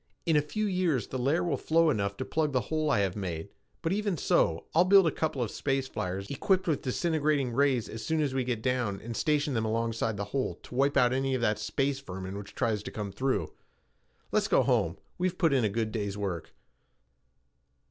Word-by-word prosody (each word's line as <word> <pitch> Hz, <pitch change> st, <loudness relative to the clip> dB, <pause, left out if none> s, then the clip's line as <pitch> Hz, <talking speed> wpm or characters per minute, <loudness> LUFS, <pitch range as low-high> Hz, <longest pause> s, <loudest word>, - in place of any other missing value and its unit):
In 165 Hz, -3 st, +3 dB
a 150 Hz, -, +5 dB
few 215 Hz, +9 st, -2 dB
years 180 Hz, -, 0 dB
the 130 Hz, -, -3 dB
layer 140 Hz, +7 st, +2 dB
will 165 Hz, -6 st, 0 dB
flow 165 Hz, +2 st, +3 dB
enough 100 Hz, -5 st, -1 dB
to 130 Hz, -, -3 dB
plug 155 Hz, -1 st, 0 dB
the 130 Hz, -, +3 dB
hole 155 Hz, -1 st, +1 dB
I 135 Hz, -, +3 dB
have 95 Hz, -2 st, 0 dB
made, 85 Hz, -5 st, -4 dB, 0.3 s
but 165 Hz, -, +1 dB
even 205 Hz, -3 st, 0 dB
so, 85 Hz, -, +2 dB
I'll 165 Hz, -, +6 dB
build 195 Hz, 0 st, +6 dB
a 165 Hz, -, +3 dB
couple 145 Hz, -5 st, -1 dB
of 110 Hz, -, -4 dB
space 135 Hz, -1 st, -1 dB
flyers 95 Hz, -3 st, -4 dB
equipped 185 Hz, +6 st, +1 dB
with 155 Hz, -4 st, +1 dB
disintegrating 150 Hz, -1 st, 0 dB
rays 135 Hz, -3 st, +2 dB
as 110 Hz, -, -7 dB
soon 160 Hz, 0 st, 0 dB
as 145 Hz, -3 st, 0 dB
we 130 Hz, -1 st, 0 dB
get 120 Hz, -3 st, -2 dB
down 125 Hz, -6 st, 0 dB
and 115 Hz, +1 st, -6 dB
station 150 Hz, 0 st, +1 dB
them 115 Hz, -2 st, 0 dB
alongside 115 Hz, -1 st, -1 dB
the 100 Hz, -, -2 dB
hole 135 Hz, -2 st, 0 dB
to -, -, -12 dB
wipe 140 Hz, +3 st, +2 dB
out 125 Hz, -2 st, +4 dB
any 135 Hz, 0 st, 0 dB
of 125 Hz, -, -2 dB
that 105 Hz, -2 st, +1 dB
space 135 Hz, +6 st, -1 dB
vermin 95 Hz, -6 st, -7 dB
which 100 Hz, 0 st, -8 dB
tries 110 Hz, -3 st, 0 dB
to -, -, -6 dB
come 105 Hz, -2 st, -4 dB
through. 130 Hz, +5 st, -1 dB, 0.8 s
Let's -, -, +2 dB
go -, -, +4 dB
home. -, -, +1 dB, 0.2 s
We've 180 Hz, 0 st, 0 dB
put 165 Hz, -5 st, +3 dB
in 130 Hz, -3 st, +3 dB
a 105 Hz, -, +2 dB
good 110 Hz, +1 st, -1 dB
day's 100 Hz, -3 st, -3 dB
work." 95 Hz, -5 st, -4 dB
130 Hz, 220 wpm, -29 LUFS, 110-155 Hz, 0.8 s, I'll